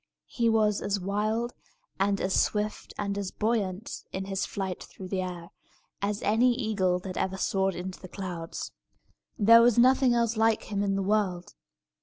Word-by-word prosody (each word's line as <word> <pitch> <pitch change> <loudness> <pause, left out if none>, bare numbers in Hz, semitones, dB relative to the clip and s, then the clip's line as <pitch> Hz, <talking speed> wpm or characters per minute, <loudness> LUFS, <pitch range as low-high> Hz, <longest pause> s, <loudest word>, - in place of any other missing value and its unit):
He 235 -2 +1
was 215 -2 +2
as 200 0 -1
wild, 215 +5 -1 0.5
and 200 0 +2
as 190 - -1
swift, 210 0 0
and 200 -1 -2
as 195 -2 -3
buoyant, 210 -2 -2
in 190 0 -4
his 195 0 -2
flight 190 -2 -4
through 185 -1 -10
the 190 -1 -1
air, 175 -2 -6 0.5
as 205 +1 -2
any 240 +4 +3
eagle 205 -7 +1
that 185 -1 -6
ever 190 0 -1
soared 190 -1 0
into 180 +1 -6
the 185 - -10
clouds. 175 -3 -6 0.7
There 230 +1 +7
was 240 -1 +4
nothing 255 0 +5
else 235 -1 +1
like 225 0 +3
him 200 -1 0
in 195 -1 0
the 195 - 0
world. 190 -3 0
200 Hz, 170 wpm, -28 LUFS, 190-220 Hz, 0.7 s, There